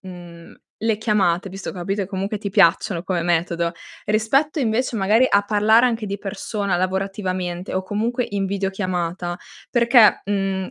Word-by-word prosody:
mhmm, 175 -2 -11 0.3
le 225 -1 +1
chiamate 200 -4 +1
visto 195 +1 -7
ho - - -3
capito 195 +3 -3
e 190 - -2
comunque 195 +2 -3
ti 200 0 -4
piacciono 175 0 +3
come 180 -2 -2
metodo, 170 0 0 0.4
rispetto 270 +9 +1
invece, 240 0 0
magari, 215 +5 +3
a 200 0 +3
parlare 215 +3 +4
anche 230 -3 0
di 200 - -3
persona 200 -1 -3
lavorativamente, 185 -1 -3
o 185 - 0
comunque 230 +5 -2
in 200 -1 -1
videochiamata, 185 -3 -3 0.3
perché, 235 -2 +5
mhmm, 195 -2 -2
195 Hz, 150 wpm, -21 LUFS, 185-215 Hz, 0.4 s, perché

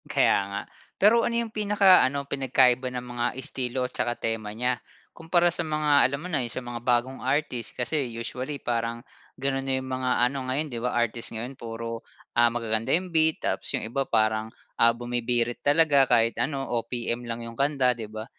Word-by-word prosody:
Kaya 140 -2 +3
nga. 100 0 -3 0.4
Pero 220 +4 +5
ano 235 0 -1
yung 220 - -12
pinaka-ano, 190 -10 +4
pinagkaiba 130 -2 +2
ng 125 0 -6
mga 120 -1 -3
estilo 130 -1 -1
at - - -7
saka 120 0 -2
tema 115 -2 -3
nya? 125 +1 -1 0.3
Kumpara, 170 +1 +2
sa 170 - 0
mga 150 -3 +3
alam 140 +1 -4
mo - - -5
na, 145 -4 +1
yung 120 - -2
sa 130 - -5
mga 120 -1 -6
bagong 125 +2 0
artist. 130 -3 -1
Kasi 130 +1 -1
usually, 125 +5 -5
parang 115 -2 -3 0.3
ganun 135 0 -1
na 135 -1 0
yung 130 - -8
mga 130 0 -1 0.2
ano 135 -1 -5
ngayon 145 +4 0
'di 120 - -3
ba, 125 - +1
artist 120 0 -1
ngayon 120 +4 -4
puro, 115 0 -6 0.4
ah, 120 0 +6
magaganda 115 -2 -1
yung 180 +2 -1
beat 160 -1 +3
tapos - - -2
yung - - -4
iba 135 +5 -2
parang, 110 0 +1 0.3
ah, 115 0 +6
bumibirit 120 0 -1
talaga. 145 -2 +4
Kahit 115 -1 +4
ano, 135 +1 -1 0.2
OPM 120 0 -3
lang 115 0 -3
yung 115 0 -9
kanta, 135 -3 +2
'di 115 -3 -7
ba? 110 0 -7
125 Hz, 190 wpm, -26 LUFS, 115-140 Hz, 0.4 s, ah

